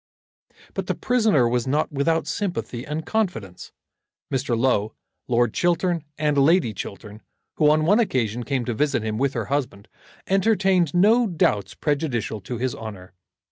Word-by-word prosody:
But -, -, -4 dB
the -, -, -1 dB
prisoner 220 Hz, -, +2 dB
was 120 Hz, +1 st, 0 dB
not 150 Hz, +5 st, 0 dB
without 155 Hz, +3 st, +1 dB
sympathy 175 Hz, -, -3 dB
and 155 Hz, +2 st, -4 dB
confidence. 115 Hz, -, -3 dB, 0.6 s
Mr. 130 Hz, -3 st, 0 dB
Low, 115 Hz, -4 st, +1 dB, 0.3 s
Lord 120 Hz, -2 st, +2 dB
Chiltern, 175 Hz, -2 st, 0 dB
and 150 Hz, -1 st, +1 dB
Lady 145 Hz, -, +3 dB
Chiltern, 105 Hz, +2 st, -8 dB, 0.4 s
who, 150 Hz, -2 st, +4 dB
on 155 Hz, +1 st, +3 dB
one 205 Hz, +7 st, +4 dB
occasion, 120 Hz, -, 0 dB
came 125 Hz, +1 st, -2 dB
to 120 Hz, -, -2 dB
visit 140 Hz, -1 st, 0 dB
him 110 Hz, 0 st, -2 dB
with 140 Hz, 0 st, +1 dB
her -, -, -2 dB
husband, 130 Hz, -8 st, -3 dB, 0.4 s
entertained 190 Hz, -4 st, +2 dB
no 220 Hz, +6 st, +4 dB
doubts 160 Hz, -, 0 dB
prejudicial 135 Hz, -8 st, -2 dB
to 120 Hz, +6 st, -5 dB
his 125 Hz, +1 st, -1 dB
honour. 100 Hz, -5 st, -9 dB
140 Hz, 150 wpm, -23 LUFS, 115-175 Hz, 0.6 s, who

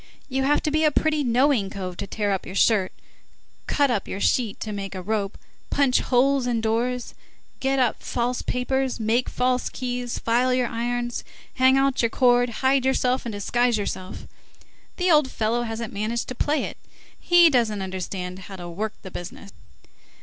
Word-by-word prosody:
You 265 Hz, 0 st, -1 dB
have 295 Hz, +2 st, +2 dB
to 305 Hz, -, 0 dB
be 310 Hz, +1 st, +2 dB
a 305 Hz, -, +5 dB
pretty 305 Hz, 0 st, +1 dB
knowing 245 Hz, -4 st, +2 dB
cove 185 Hz, -3 st, -6 dB
to -, -, -5 dB
tear 205 Hz, -1 st, -1 dB
up 195 Hz, -, -1 dB
your 185 Hz, -, -8 dB
shirt, 200 Hz, -2 st, +3 dB, 0.8 s
cut 285 Hz, -3 st, +2 dB
up 210 Hz, -5 st, -1 dB
your 195 Hz, -, -5 dB
sheet 225 Hz, -1 st, +1 dB
to 215 Hz, -, -4 dB
make 195 Hz, -1 st, -5 dB
a 185 Hz, -, -4 dB
rope, 205 Hz, 0 st, -2 dB, 0.3 s
punch 275 Hz, -3 st, +3 dB
holes 265 Hz, +1 st, +2 dB
in 235 Hz, -2 st, 0 dB
doors, 235 Hz, +2 st, -1 dB, 0.5 s
get 270 Hz, 0 st, 0 dB
up 250 Hz, -4 st, +1 dB
false 245 Hz, +1 st, -2 dB
papers, 260 Hz, +1 st, -1 dB
make 225 Hz, +3 st, +1 dB
false 250 Hz, 0 st, 0 dB
keys, 245 Hz, -1 st, -4 dB
file 250 Hz, +2 st, +2 dB
your 255 Hz, -1 st, +1 dB
irons, 240 Hz, +1 st, -2 dB, 0.3 s
hang 260 Hz, +1 st, +4 dB
out 270 Hz, -1 st, +2 dB
your 230 Hz, -, +2 dB
cord, 245 Hz, 0 st, +3 dB, 0.2 s
hide 265 Hz, 0 st, +4 dB
yourself, 255 Hz, -1 st, +1 dB
and 225 Hz, -, -4 dB
disguise 240 Hz, +3 st, +1 dB
yourself! 185 Hz, -2 st, -5 dB, 0.7 s
The 360 Hz, -1 st, +2 dB
old 300 Hz, -4 st, +5 dB
fellow 230 Hz, +1 st, 0 dB
hasn't 225 Hz, -1 st, -4 dB
managed 220 Hz, +3 st, -2 dB
to -, -, -3 dB
play 295 Hz, +4 st, 0 dB
it, -, -, -6 dB, 0.4 s
he 345 Hz, -2 st, +6 dB
doesn't 220 Hz, -6 st, +1 dB
understand 185 Hz, -1 st, -5 dB
how 195 Hz, +1 st, -9 dB
to 175 Hz, -2 st, -8 dB
work 210 Hz, +6 st, -4 dB
the 190 Hz, -, -9 dB
business." 180 Hz, +3 st, -8 dB
240 Hz, 180 wpm, -24 LUFS, 210-260 Hz, 0.8 s, he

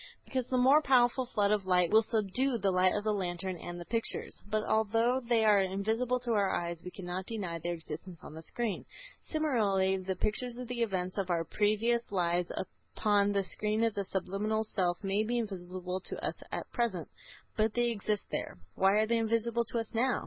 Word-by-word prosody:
Because 255 Hz, -2 st, -2 dB
the 255 Hz, -, 0 dB
more 265 Hz, +5 st, +6 dB
powerful 255 Hz, -2 st, +3 dB
flood 205 Hz, -4 st, +1 dB
of 205 Hz, -3 st, +1 dB
light 180 Hz, -2 st, +3 dB
will 220 Hz, +1 st, +7 dB
subdue 230 Hz, +4 st, +1 dB
the 195 Hz, -3 st, +1 dB
light 185 Hz, 0 st, +3 dB
of 205 Hz, -, -1 dB
the 215 Hz, 0 st, +1 dB
lantern 185 Hz, -1 st, -2 dB
and 175 Hz, +1 st, -7 dB
the 175 Hz, -, -7 dB
pictures. 230 Hz, +3 st, -2 dB
But 215 Hz, 0 st, 0 dB
although 225 Hz, +4 st, +2 dB
they 235 Hz, -3 st, +2 dB
are 210 Hz, -2 st, +6 dB
invisible 220 Hz, +6 st, 0 dB
to 245 Hz, -1 st, -2 dB
our 200 Hz, -3 st, +3 dB
eyes 170 Hz, -1 st, -3 dB
we 180 Hz, -, -6 dB
cannot 180 Hz, 0 st, -5 dB
deny 190 Hz, -7 st, -3 dB
their 175 Hz, +1 st, -2 dB
existence 160 Hz, +2 st, -8 dB
on -, -, -9 dB
the 160 Hz, -, -8 dB
screen. 225 Hz, +5 st, -2 dB, 0.4 s
Similarly, 205 Hz, -, +1 dB
the 190 Hz, 0 st, -3 dB
pictures 235 Hz, +5 st, -1 dB
of 250 Hz, -1 st, -6 dB
the 245 Hz, -1 st, -3 dB
events 185 Hz, -3 st, -1 dB
of 190 Hz, -2 st, -2 dB
our 170 Hz, -2 st, +1 dB
previous 215 Hz, +6 st, +1 dB
lives 175 Hz, -2 st, +1 dB, 0.4 s
upon 205 Hz, -1 st, +3 dB
the 200 Hz, -1 st, +1 dB
screen 215 Hz, +3 st, -1 dB
of 230 Hz, -1 st, +2 dB
the 200 Hz, -, -2 dB
subliminal 200 Hz, +3 st, -1 dB
self 185 Hz, -4 st, -1 dB
may 195 Hz, +2 st, +1 dB
be 235 Hz, +3 st, 0 dB
invisible 185 Hz, -4 st, -3 dB
to -, -, -4 dB
us -, -, -3 dB
at -, -, -5 dB
present, 220 Hz, -, -1 dB, 0.5 s
but 215 Hz, 0 st, +1 dB
they 240 Hz, 0 st, +2 dB
exist 210 Hz, -1 st, -1 dB
there. -, -, -3 dB, 0.2 s
Why 195 Hz, +1 st, +3 dB
are 215 Hz, +1 st, +4 dB
they 230 Hz, +1 st, +1 dB
invisible 230 Hz, +1 st, +1 dB
to 235 Hz, -, -2 dB
us 225 Hz, -1 st, -3 dB
now? 245 Hz, +3 st, +2 dB
210 Hz, 200 wpm, -31 LUFS, 185-230 Hz, 0.5 s, will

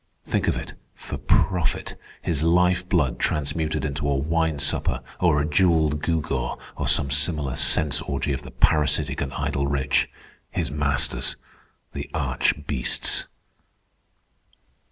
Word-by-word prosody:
Think -, -, -1 dB
of -, -, +1 dB
it. -, -, -6 dB, 0.2 s
For -, -, -7 dB
profit—his 85 Hz, -3 st, -1 dB
life 90 Hz, +2 st, +2 dB
blood 75 Hz, -10 st, +1 dB
transmuted 75 Hz, +1 st, -1 dB
into 70 Hz, 0 st, -2 dB
a 70 Hz, -, +2 dB
wine 80 Hz, +2 st, 0 dB
supper, 70 Hz, +1 st, 0 dB, 0.2 s
or 85 Hz, -5 st, +3 dB
a 75 Hz, -, +1 dB
jewelled 80 Hz, -2 st, +2 dB
gewgaw, 70 Hz, -7 st, -1 dB, 0.2 s
or -, -, -3 dB
some 70 Hz, -, +3 dB
similar 70 Hz, -1 st, +1 dB
sense 75 Hz, -3 st, +4 dB
orgy 70 Hz, -, -2 dB
of 65 Hz, -, -3 dB
the -, -, -10 dB
parasitic 75 Hz, -2 st, +1 dB
and 70 Hz, -1 st, -2 dB
idle 70 Hz, 0 st, -1 dB
rich, 70 Hz, -1 st, +1 dB, 0.4 s
his -, -, -2 dB
masters, 70 Hz, -2 st, 0 dB, 0.6 s
the -, -, -6 dB
arch 75 Hz, -, 0 dB
beasts." 65 Hz, -4 st, 0 dB
75 Hz, 130 wpm, -24 LUFS, 70-80 Hz, 0.6 s, sense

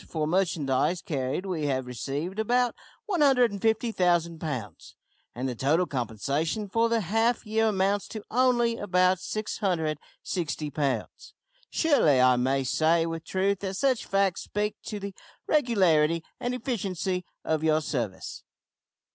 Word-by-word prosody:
For 155 Hz, -2 st, -1 dB
merchandise 165 Hz, -2 st, +1 dB
carried 140 Hz, 0 st, -3 dB
we 165 Hz, -6 st, -2 dB
have 130 Hz, -2 st, -1 dB
received 140 Hz, -, -4 dB
about 245 Hz, +2 st, +2 dB, 0.3 s
150,000 220 Hz, -, +2 dB
pounds, 130 Hz, -11 st, -6 dB, 0.4 s
and 125 Hz, +2 st, -2 dB
the 125 Hz, -, -2 dB
total 150 Hz, +9 st, +2 dB
compensation 140 Hz, -, -2 dB
for 230 Hz, +4 st, +1 dB
the 230 Hz, -1 st, +2 dB
half 225 Hz, +6 st, +1 dB
year 220 Hz, +1 st, +2 dB
amounts 200 Hz, -1 st, +1 dB
to 215 Hz, -2 st, -7 dB
only 240 Hz, -1 st, +3 dB
about 185 Hz, -2 st, +2 dB
660 175 Hz, -5 st, -3 dB
pounds. 135 Hz, -6 st, -3 dB, 0.3 s
Surely 280 Hz, -, +3 dB
I 125 Hz, 0 st, +6 dB
may 135 Hz, +2 st, +1 dB
say 160 Hz, +6 st, +2 dB
with 165 Hz, 0 st, -4 dB
truth 195 Hz, +1 st, 0 dB
that 195 Hz, -1 st, -4 dB
such 260 Hz, +2 st, +1 dB
facts 195 Hz, -2 st, +1 dB
speak 210 Hz, 0 st, -2 dB
to 210 Hz, -, -4 dB
the 200 Hz, 0 st, -6 dB, 0.3 s
regularity 170 Hz, -, +3 dB, 0.2 s
and 245 Hz, 0 st, -2 dB
efficiency 190 Hz, -, -2 dB, 0.2 s
of 160 Hz, -1 st, 0 dB
your 155 Hz, -1 st, +3 dB
service. 120 Hz, -11 st, -4 dB
180 Hz, 130 wpm, -27 LUFS, 150-215 Hz, 0.4 s, I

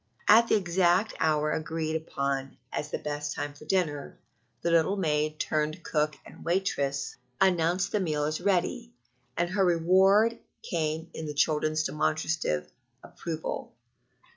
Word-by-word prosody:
At 230 Hz, +2 st, +7 dB
the -, -, +4 dB
exact 185 Hz, +1 st, +2 dB
hour 155 Hz, -1 st, +2 dB
agreed 160 Hz, 0 st, -2 dB
upon 140 Hz, -4 st, -2 dB, 0.2 s
as 150 Hz, -, -3 dB
the -, -, -2 dB
best 145 Hz, 0 st, -4 dB
time 145 Hz, 0 st, -4 dB
for 145 Hz, -, -14 dB
dinner, 155 Hz, -5 st, -1 dB, 0.5 s
the 170 Hz, -, +1 dB
little 170 Hz, +4 st, +3 dB
maid, 155 Hz, -3 st, 0 dB
turned 155 Hz, +2 st, -1 dB
cook 150 Hz, -1 st, 0 dB
and -, -, -13 dB
waitress, 140 Hz, -7 st, -1 dB, 0.2 s
announced 180 Hz, -1 st, +2 dB
the 210 Hz, -, +1 dB
meal 155 Hz, -6 st, 0 dB
as 155 Hz, +3 st, -1 dB
ready, 205 Hz, +6 st, 0 dB, 0.4 s
and 175 Hz, 0 st, 0 dB
her 195 Hz, 0 st, +2 dB
reward 190 Hz, +6 st, +4 dB, 0.2 s
came 160 Hz, 0 st, -2 dB
in 160 Hz, -, -5 dB
the 150 Hz, -, -5 dB
children's 155 Hz, +1 st, +2 dB
demonstrative 155 Hz, -, -1 dB, 0.3 s
approval. 160 Hz, -7 st, -5 dB
160 Hz, 140 wpm, -28 LUFS, 150-180 Hz, 0.5 s, At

